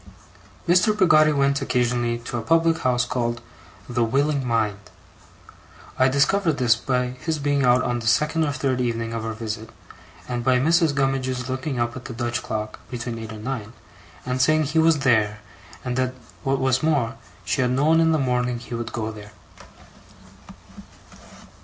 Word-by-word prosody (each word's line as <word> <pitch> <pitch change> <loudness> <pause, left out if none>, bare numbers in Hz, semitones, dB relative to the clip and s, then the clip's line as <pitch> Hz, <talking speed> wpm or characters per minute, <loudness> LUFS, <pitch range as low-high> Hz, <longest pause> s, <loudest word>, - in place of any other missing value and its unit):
Mr. 185 +5 +4
Peggotty 155 -5 +5
went 140 -1 +1
occasionally 120 -2 0
to 120 +1 -7
a 120 - -1
public 165 +6 +2
house 125 -1 +1
called 120 -1 -2 0.5
The 120 -1 0
Willing 140 +4 +1
Mind. 105 -5 -1 1.1
I 130 - +4
discovered 160 +6 +2
this, 120 -3 +4
by 125 +1 -1
his 140 +6 -3
being 145 -1 0
out 125 0 +4
on 120 0 -1
the 115 - -5
second 150 +8 +2
or 145 - 0
third 130 -2 -1
evening 115 -1 -2
of 115 -1 -3
our 115 0 -3
visit, 110 0 -5 0.6
and 120 -1 -3
by 130 +1 +3
Mrs. 160 +2 +3
Gummidge's 130 -2 -1
looking 130 +1 -3
up 120 0 -1
at 125 - -9
the 125 - -6
Dutch 120 +1 -2
clock, 110 -1 -5
between 120 -2 -5
eight 110 -1 -7
and 110 -1 -9
nine, 115 -3 -4 0.5
and 125 0 -1
saying 155 +3 +3
he 150 +2 0
was 160 -2 +4
there, 110 -5 +2 0.5
and 125 -1 -2
that, 130 0 0 0.3
what 135 0 0
was 130 -1 +1
more, 140 -7 +1 0.3
she 130 - 0
had 125 - +2
known 150 +6 +3
in 165 0 +4
the 160 - +3
morning 125 -3 0
he 120 0 -9
would 120 0 -4
go 110 -1 -3
there. 105 -1 -12
125 Hz, 170 wpm, -23 LUFS, 120-140 Hz, 1.1 s, Peggotty